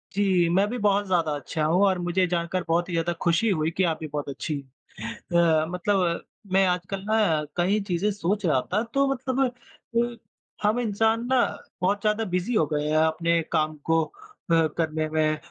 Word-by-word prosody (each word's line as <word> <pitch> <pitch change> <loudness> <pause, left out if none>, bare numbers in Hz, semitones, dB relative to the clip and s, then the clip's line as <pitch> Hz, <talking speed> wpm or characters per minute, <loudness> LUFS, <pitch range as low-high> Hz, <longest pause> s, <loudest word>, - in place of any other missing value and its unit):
जी, 190 -4 +3
मैं 195 +4 +3
भी 245 - -3
बहुत 205 -1 +2
ज़्यादा 170 -4 +1
अच्छा 155 +2 -3
हूँ, 175 +5 +2
और 190 -2 +2
मुझे 175 +1 +1
जानकर 175 +1 -1
बहुत 170 +2 +1
ही - - -4
ज़्यादा 165 +1 0
खुशी 175 +7 +2
हुई 160 -4 +1
कि 190 - +3
आप 160 - -3
भी 160 - -5
बहुत 145 -1 -3
अच्छी 140 +3 -4 0.5
हैं। 115 +1 -5 0.5
अ, - - -1
मतलब 180 -1 0 0.3
मैं 195 0 +5
आजकल 180 +2 -2
ना 200 -9 +2
कई 190 +5 +2
चीज़ें 180 +3 0
सोच 200 +1 -1
रहा 150 -5 +3
था, 210 +3 +2
तो 275 +4 +1
मतलब 260 0 -3 0.6
अ, 240 0 0 0.5
हम 220 +3 +2
इंसान 225 +1 +1
ना 260 -1 +3 0.4
बहुत 200 +3 +1
ज़्यादा 215 +1 +1
बिज़ी 180 +7 0
हो 160 - +4
गए 150 0 0
है 155 - +1
अपने 165 +1 +1
काम 155 -1 +1
को 165 0 +4
अ, 400 - -1
करने 155 -1 0
में 155 0 +1
180 Hz, 190 wpm, -25 LUFS, 165-210 Hz, 0.6 s, मैं